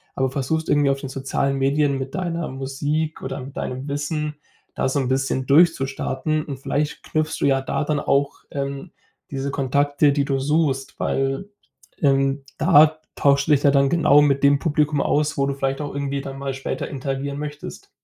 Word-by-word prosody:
aber 130 0 +1
versuchst, 150 +4 -2
irgendwie 145 -1 +3
auf 135 0 0
den 135 - -6
sozialen 135 +1 -1
Medien 140 +1 +2
mit 135 0 -5
deiner 170 -3 -2
Musik 145 +4 -3
oder 135 0 -5
mit 135 +2 -10
deinem 130 +2 -4
Wissen 150 +1 -2 0.4
da - - 0
so 140 - 0
'n 130 - -1
bisschen 130 0 0
durchzustarten. 150 0 +2
Und 140 -3 -6
vielleicht 145 +2 -2
knüpfst 155 0 -1
du - - +1
ja 135 -1 +3
da 135 - -2
dann 150 0 0
auch, 140 0 0
ähm, 140 +3 -4 0.4
diese 140 0 -3
Kontakte, 145 +2 +2
die 140 -1 +1
du 135 -1 0
suchst, 135 -2 0
weil, 135 +8 -1 0.5
ähm, 135 -1 +2
da 155 -1 +5 0.2
tauschst 140 0 +3
du - - +5
dich 145 - +3
ja 140 - +6
dann 140 0 +3
genau 150 -4 +5
mit 140 -2 +2
dem 140 0 +5
Publikum 150 -1 +1
aus, 150 +2 +1
wo 140 - +2
du 140 - -1
vielleicht 135 0 -2
auch 145 -1 -4
irgendwie 140 0 -2
dann 135 0 -7
mal 135 -1 -3
später 135 - -4
interagieren 140 +1 -4
möchtest. 150 0 -7
140 Hz, 185 wpm, -22 LUFS, 135-150 Hz, 0.5 s, ja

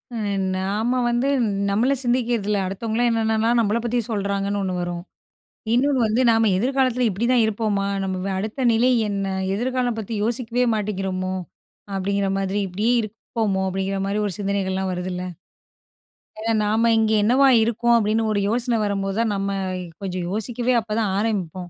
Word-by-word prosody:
ம். 205 -3 -1 0.2
நாம 215 +7 0
வந்து 240 +3 +1 0.4
நம்மளை 235 +8 +2
சிந்திக்கிறது 240 -3 0
இல்லை. 205 -1 +1
அடுத்தவங்கள்லாம் 225 +5 -1
என்னென்னலாம் 225 +1 +2
நம்பளை 220 0 +1
பத்தி 240 +1 +1
சொல்றாங்கன்னு 200 -1 -1
ஒண்ணு 185 -1 -2
வரும். 175 -1 -4 0.7
இன்னொன்னு 270 +1 +2
வந்து, 220 +4 +1
"நாம 225 -1 +3
எதிர்காலத்துல 255 +2 +1
இப்படிதான் 235 +4 +2
இருப்போமா? 210 -2 0 0.2
நம்ப 190 -1 -2
வ - - -1
அடுத்த 220 +6 -2
நிலை 235 +3 +3 0.2
என்ன? 200 -1 -2 0.3
எதிர்காலம் 245 0 -1
பத்தி 220 +1 -4
யோசிக்கவே 240 +1 0
மாட்டேங்கிறோமோ?" 190 -3 -2 0.6
அப்படீங்கிற 200 +1 0
மாதிரி, 195 +1 -1
"இப்படி 195 +5 -2
இருப்போமோ?" 215 -2 -2
அப்படீங்கிற 195 +1 -2
மாரி 205 +2 0
ஒரு 200 - -3
சிந்தனைகள்லாம் 190 -1 -1
வருதுல்ல. 180 0 -4 1.2
ஏன்னா, 225 +1 -1
"நாம 220 +2 +2
இங்க 220 -1 +2
என்னவா 260 +6 +4 0.2
இருக்கோம்?" 235 +1 +2
அப்படீன்னு 220 0 +1
ஒரு 205 - +1
யோசனை 240 +1 0
வரும்போது 195 -1 -1
தான், 225 -2 0
நம்ம 195 0 -2 0.5
கொஞ்சம் 185 -2 -3
யோசிக்கவே 240 +4 -1
அப்பதான் 215 -1 -1
ஆரம்பிப்போம். 185 -5 -2
215 Hz, 145 wpm, -22 LUFS, 195-235 Hz, 1.2 s, என்னவா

